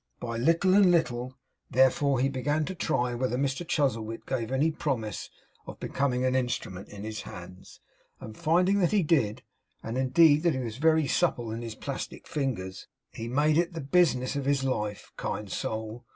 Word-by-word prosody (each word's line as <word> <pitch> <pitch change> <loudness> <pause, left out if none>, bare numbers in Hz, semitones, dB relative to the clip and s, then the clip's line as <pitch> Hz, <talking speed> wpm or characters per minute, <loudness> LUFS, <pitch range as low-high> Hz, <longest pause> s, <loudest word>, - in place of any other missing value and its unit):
By 115 -1 -4
little 165 +9 +3
and 200 -2 +6
little, 130 -7 0 0.3
therefore, 130 +1 +3
he 135 - +3
began 145 +3 -1
to 185 - -4
try 125 -8 0
whether 125 0 -1
Mr 140 +5 -1
Chuzzlewit 115 -8 -1
gave 125 -3 -3
any 145 +5 +2
promise 125 -9 -3 0.4
of - - -9
becoming 130 -2 0
an 130 - +2
instrument 120 -7 -2
in 100 -1 -9
his 110 0 -5
hands, 90 +1 -11 0.4
and 110 - -9
finding 180 - +2
that 180 +1 +2
he 205 -3 +3
did, 145 -10 +1 0.4
and 115 +3 -3
indeed 150 +3 +5
that 170 -3 +2
he - - -2
was 115 -3 -4
very 160 +1 +3
supple 120 -3 0
in 115 +1 -4
his 115 -2 -6
plastic - - -6
fingers, 110 -11 -3 0.3
he 115 - -6
made 150 +5 +2
it 170 0 0
the 165 - -5
business 135 -4 +2
of 140 -1 -2
his 140 -1 +1
life 105 -6 -3
kind 105 -3 -4
soul! 110 +3 -4
130 Hz, 180 wpm, -28 LUFS, 115-155 Hz, 0.4 s, and